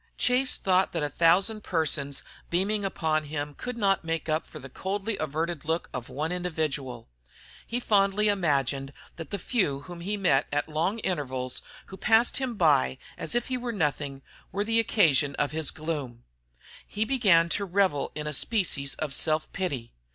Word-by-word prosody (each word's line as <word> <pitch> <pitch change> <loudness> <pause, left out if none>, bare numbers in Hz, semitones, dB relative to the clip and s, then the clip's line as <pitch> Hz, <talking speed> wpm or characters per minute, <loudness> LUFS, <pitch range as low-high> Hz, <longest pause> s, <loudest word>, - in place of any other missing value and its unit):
Chase 255 +1 +2
thought 185 0 +2
that 165 -3 -1
a 145 - -1
thousand 190 +8 +3
persons 145 -4 0 0.3
beaming 200 +4 +1
upon 160 -5 0
him 145 0 -4
could 250 - -6
not 195 -4 +2
make 165 0 -2
up 155 0 0
for - - -10
the 135 -2 -8
coldly 195 - -3
averted 155 +1 -2
look 160 +2 -2
of 125 -2 -5
one 150 +6 -2
individual. 155 -9 -2 0.6
He 240 - -1
fondly 205 -2 +3
imagined 140 - +1 0.2
that 165 - -7
the 200 - -2
few 180 - 0
whom 175 +2 -9
he 205 +4 -2
met 175 -9 +3
at 145 0 0
long 160 +7 0
intervals, 130 -7 -2 0.2
who 190 - -10
passed 230 +2 +3
him 260 -3 -2
by 145 -8 +3 0.2
as - - -2
if 240 - 0
he 255 - 0
were 245 -1 -3
nothing, 145 -7 -2 0.3
were 200 +2 0
the 225 +2 +2
occasion 150 - +3
of 145 - 0
his 155 -1 0
gloom. 145 -7 -4 0.6
He 215 +2 -1
began 200 -10 +4
to 200 - 0
revel 185 -6 +1
in 150 - -4
a 150 - -3
species 145 - 0
of 150 -3 -3
self 155 +2 0
pity. 140 -11 -3
165 Hz, 175 wpm, -27 LUFS, 145-200 Hz, 0.6 s, began